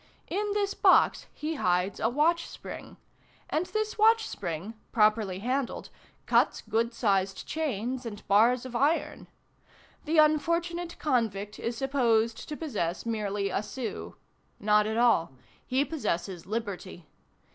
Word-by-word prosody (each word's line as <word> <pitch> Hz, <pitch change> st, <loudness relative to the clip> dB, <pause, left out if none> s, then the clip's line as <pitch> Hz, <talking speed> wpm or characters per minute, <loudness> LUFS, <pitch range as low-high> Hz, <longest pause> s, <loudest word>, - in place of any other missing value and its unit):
In 410 Hz, +2 st, -1 dB
this 405 Hz, -1 st, 0 dB
box -, -, +4 dB
he 305 Hz, +2 st, -4 dB
hides 180 Hz, +2 st, +1 dB
a 225 Hz, -, +2 dB
watch 325 Hz, +6 st, +2 dB
spring, -, -, -9 dB, 0.5 s
and 330 Hz, +4 st, 0 dB
this 435 Hz, 0 st, -2 dB
watch 445 Hz, +1 st, +5 dB
spring, 180 Hz, +2 st, -5 dB, 0.2 s
properly 215 Hz, -3 st, +2 dB
handled, 250 Hz, +5 st, -2 dB, 0.3 s
cuts -, -, +2 dB
good 230 Hz, +1 st, +1 dB
sized 195 Hz, -4 st, 0 dB
chains 260 Hz, -5 st, -2 dB
and 215 Hz, -4 st, -8 dB
bars 235 Hz, +5 st, +4 dB
of 250 Hz, -1 st, -7 dB
iron. 290 Hz, +7 st, 0 dB, 0.8 s
The 320 Hz, +2 st, 0 dB
unfortunate 335 Hz, +3 st, +2 dB
convict 215 Hz, -7 st, -1 dB
is 230 Hz, 0 st, -3 dB
supposed 235 Hz, -4 st, +1 dB
to 300 Hz, -, -4 dB
possess 200 Hz, -, -3 dB
merely 205 Hz, -3 st, -1 dB
a -, -, 0 dB
sou; 230 Hz, +3 st, -6 dB, 0.4 s
not 210 Hz, 0 st, +3 dB
at 220 Hz, +1 st, -2 dB
all, 230 Hz, -, +3 dB, 0.3 s
he 265 Hz, +2 st, +2 dB
possesses 185 Hz, -, -3 dB
liberty. 200 Hz, -5 st, -5 dB
235 Hz, 130 wpm, -28 LUFS, 205-305 Hz, 0.8 s, watch